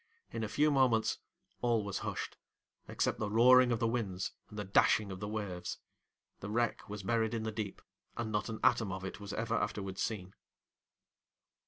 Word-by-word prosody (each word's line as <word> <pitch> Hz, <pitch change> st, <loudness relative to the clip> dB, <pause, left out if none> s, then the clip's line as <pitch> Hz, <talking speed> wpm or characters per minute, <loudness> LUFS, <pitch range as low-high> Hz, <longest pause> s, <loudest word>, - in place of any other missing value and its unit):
In 115 Hz, -1 st, -3 dB
a -, -, -1 dB
few 150 Hz, +7 st, +3 dB
moments 130 Hz, -5 st, +3 dB, 0.4 s
all 120 Hz, -3 st, +2 dB
was 100 Hz, -1 st, -3 dB
hushed, -, -, -4 dB, 0.5 s
except -, -, 0 dB
the 110 Hz, -, -1 dB
roaring 125 Hz, +3 st, +7 dB
of 115 Hz, -, +2 dB
the 115 Hz, 0 st, +1 dB
winds 105 Hz, -6 st, -2 dB, 0.2 s
and 105 Hz, -, -10 dB
the 105 Hz, -, -2 dB
dashing 100 Hz, +1 st, +3 dB
of 95 Hz, -, -6 dB
the 105 Hz, -, -4 dB
waves; 100 Hz, -4 st, -4 dB, 0.6 s
the 100 Hz, -, -6 dB
wreck 120 Hz, 0 st, 0 dB
was 105 Hz, -1 st, -5 dB
buried 115 Hz, +2 st, +1 dB
in 110 Hz, -, -2 dB
the 110 Hz, -, -2 dB
deep, 105 Hz, -2 st, -5 dB, 0.3 s
and 115 Hz, -2 st, -2 dB
not 105 Hz, +1 st, -1 dB
an 110 Hz, -, -4 dB
atom 110 Hz, -4 st, +3 dB
of 95 Hz, 0 st, -4 dB
it 95 Hz, -, -6 dB
was 100 Hz, 0 st, -7 dB
ever 115 Hz, +2 st, -2 dB
afterwards 95 Hz, -4 st, -2 dB
seen. 95 Hz, -4 st, -3 dB
110 Hz, 185 wpm, -33 LUFS, 100-115 Hz, 0.6 s, roaring